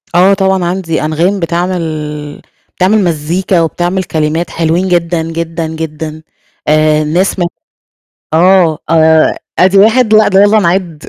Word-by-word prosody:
آه، 190 Hz, +3 st, +5 dB
طبعًا 190 Hz, -2 st, 0 dB
عندي 175 Hz, -2 st, -2 dB
أنغام 175 Hz, +6 st, 0 dB
بتعمل 160 Hz, -4 st, -4 dB, 0.4 s
بتعمل 195 Hz, +3 st, +2 dB
مزيكا 170 Hz, +2 st, -1 dB
وبتعمل 175 Hz, +3 st, -1 dB
كلمات 160 Hz, +1 st, -2 dB
حلوين 170 Hz, +3 st, -1 dB
جدًا، 170 Hz, -1 st, 0 dB
جدًا، 165 Hz, 0 st, -4 dB
جدًا، 155 Hz, -1 st, -6 dB, 0.5 s
آآ 155 Hz, 0 st, +2 dB
ناس 180 Hz, +5 st, -1 dB
مو 175 Hz, -, +1 dB, 0.9 s
آه، 175 Hz, -2 st, +3 dB
آآ 160 Hz, -1 st, +3 dB, 0.2 s
أَدِي 190 Hz, +2 st, +4 dB
1 220 Hz, +2 st, +3 dB
لأ، 215 Hz, 0 st, +5 dB
ده 195 Hz, 0 st, +3 dB
يالّا 210 Hz, +1 st, +4 dB
نِعدّ 170 Hz, -4 st, -1 dB
170 Hz, 130 wpm, -11 LUFS, 160-190 Hz, 0.9 s, آه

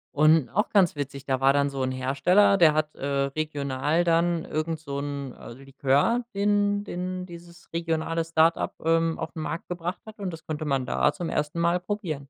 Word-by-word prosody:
und 155 Hz, -1 st, +4 dB
auch 210 Hz, +3 st, 0 dB
ganz 190 Hz, -7 st, +3 dB
witzig, 140 Hz, -1 st, -5 dB
da 130 Hz, -1 st, 0 dB
war 135 Hz, +1 st, +4 dB
dann 140 Hz, 0 st, +2 dB
so 135 Hz, -1 st, -3 dB
'n 130 Hz, -, -1 dB
Hersteller, 140 Hz, +11 st, +3 dB
der 160 Hz, -4 st, +6 dB
hat, 155 Hz, 0 st, -1 dB
äh, -, -, -6 dB
regional 140 Hz, +2 st, -1 dB
dann 170 Hz, 0 st, +1 dB
irgend 155 Hz, +1 st, -2 dB
so 140 Hz, -3 st, -5 dB
'n, 140 Hz, -2 st, -5 dB
äh, -, -, -11 dB
Likör, 135 Hz, -, 0 dB
den 205 Hz, 0 st, +1 dB
den 185 Hz, -1 st, -4 dB
dieses 170 Hz, -1 st, -13 dB
regionale 165 Hz, 0 st, -1 dB
Start-up, 165 Hz, 0 st, +2 dB
ähm, 165 Hz, 0 st, +1 dB
auf'n 160 Hz, -, -5 dB
Markt 165 Hz, +2 st, -5 dB
gebracht 175 Hz, +1 st, -4 dB
hat 220 Hz, 0 st, -12 dB
und 190 Hz, -3 st, -3 dB
das 165 Hz, -, -9 dB
konnte 155 Hz, 0 st, -4 dB
man 135 Hz, -3 st, 0 dB
da 150 Hz, -, +1 dB
zum 175 Hz, -3 st, -4 dB
1. 150 Hz, +3 st, -2 dB
Mal 170 Hz, +1 st, +2 dB
probieren. 180 Hz, -7 st, -4 dB
160 Hz, 190 wpm, -26 LUFS, 140-175 Hz, -, der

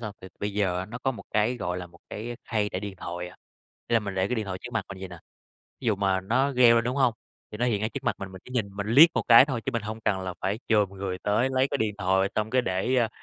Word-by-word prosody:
hông? 110 Hz, -3 st, -6 dB, 0.2 s
B -, -, -47 dB
bây 105 Hz, 0 st, -2 dB
giờ 95 Hz, -3 st, 0 dB
nó 120 Hz, +2 st, -6 dB
có 135 Hz, +2 st, 0 dB
một 120 Hz, -, -9 dB
cái, 110 Hz, +4 st, +1 dB
gọi 90 Hz, -4 st, -3 dB
là, 90 Hz, -, -6 dB
một 85 Hz, 0 st, -19 dB
cái 120 Hz, +3 st, -6 dB
khay 105 Hz, -3 st, 0 dB
để 95 Hz, -, -4 dB
điện 100 Hz, -1 st, -6 dB
thoại 90 Hz, 0 st, -5 dB
à, -, -, -15 dB, 0.5 s
ý -, -, +1 dB
là 115 Hz, -, +5 dB
mình 100 Hz, -2 st, -5 dB
để 95 Hz, +1 st, 0 dB
cái 125 Hz, -, 0 dB
điện 110 Hz, -3 st, -2 dB
thoại 95 Hz, -1 st, -4 dB
trước -, -, -7 dB
mặt 110 Hz, -4 st, -1 dB
mình 95 Hz, -, -8 dB
vậy 95 Hz, 0 st, -6 dB
nè. 90 Hz, -1 st, -10 dB, 0.6 s
Ví 130 Hz, -, -6 dB
dụ 110 Hz, -3 st, +2 dB
mà 95 Hz, -1 st, +1 dB
nó 130 Hz, +8 st, +1 dB
reo 120 Hz, -2 st, +6 dB
lên 115 Hz, -, +2 dB
đúng 125 Hz, +3 st, -1 dB
hông? 130 Hz, -4 st, +3 dB, 0.4 s
Thì 105 Hz, -, -7 dB
nó 120 Hz, -, +1 dB
hiện 105 Hz, -4 st, +1 dB
ngay 110 Hz, -, 0 dB
trước 135 Hz, +1 st, -6 dB
mặt -, -, 0 dB
mình, 95 Hz, -1 st, -7 dB
mình 95 Hz, -, -10 dB
chỉ -, -, -14 dB
nhìn 115 Hz, -5 st, 0 dB
mình 100 Hz, 0 st, -3 dB
liếc 150 Hz, +8 st, +8 dB
một -, -, +1 dB
cái 115 Hz, +2 st, +9 dB
thôi, 130 Hz, -5 st, -3 dB
chứ 135 Hz, -, -1 dB
mình 115 Hz, -3 st, -1 dB
hông 110 Hz, +1 st, -6 dB
cần 105 Hz, -3 st, 0 dB, 0.2 s
phải 100 Hz, +3 st, -1 dB
chồm 105 Hz, -4 st, +3 dB
người 95 Hz, -1 st, -4 dB
tới 105 Hz, +6 st, +1 dB
lấy 130 Hz, +1 st, +2 dB
cái 140 Hz, -, -1 dB
điện 110 Hz, -3 st, 0 dB
thoại 95 Hz, 0 st, +2 dB
xong 110 Hz, 0 st, -1 dB
cái 130 Hz, 0 st, +3 dB
để, 95 Hz, +6 st, 0 dB
a, 120 Hz, -3 st, +3 dB
105 Hz, 310 wpm, -27 LUFS, 95-120 Hz, 0.6 s, cái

